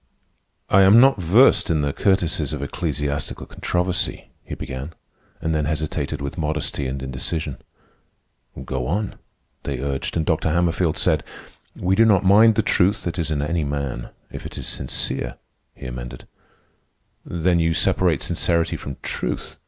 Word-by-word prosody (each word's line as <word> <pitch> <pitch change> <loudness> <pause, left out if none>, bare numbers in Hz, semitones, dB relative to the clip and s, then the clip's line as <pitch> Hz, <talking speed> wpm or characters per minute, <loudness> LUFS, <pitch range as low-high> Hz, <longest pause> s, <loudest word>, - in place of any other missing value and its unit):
"I 95 - +5
am 100 +4 +8
not 130 -5 +5
versed 105 +11 +5
in 80 -3 +2
the 70 -1 0
courtesies 85 -6 +1
of 70 -2 -3
ecclesiastical 75 -2 -3
controversy," 90 +1 -2
he - - -6
began, 65 +5 -6 0.5
and 80 0 -1
then 75 -2 0
hesitated 75 -1 -2
with 70 +5 -5
modesty 75 -3 -2
and 65 +1 -4
indecision. 65 +3 -3 1.1
"Go 65 -1 -3
on," 100 +5 -2 0.4
they 70 -2 -3
urged, 70 +4 -2
and 80 - 0
Dr. 80 +1 +1
Hammerfield 85 0 +1
said: - - +1 0.5
"We 90 +1 0
do 115 +3 +5
not 100 -4 +4
mind 110 +3 +6
the 110 - +2
truth 100 0 +2
that 85 0 -3
is 80 -2 -1
in 75 -2 -1
any 80 +2 0
man. 70 -4 -3 0.2
If - - -7
it - - -10
is - - -5
sincere," 60 -1 -2 0.4
he 70 - -10
amended. 60 0 -7 1.0
"Then 85 0 +1
you 80 0 +2
separate 85 -6 +2
sincerity 85 -1 0
from 70 -1 -7
truth?" - - -4
80 Hz, 155 wpm, -22 LUFS, 70-90 Hz, 1.1 s, am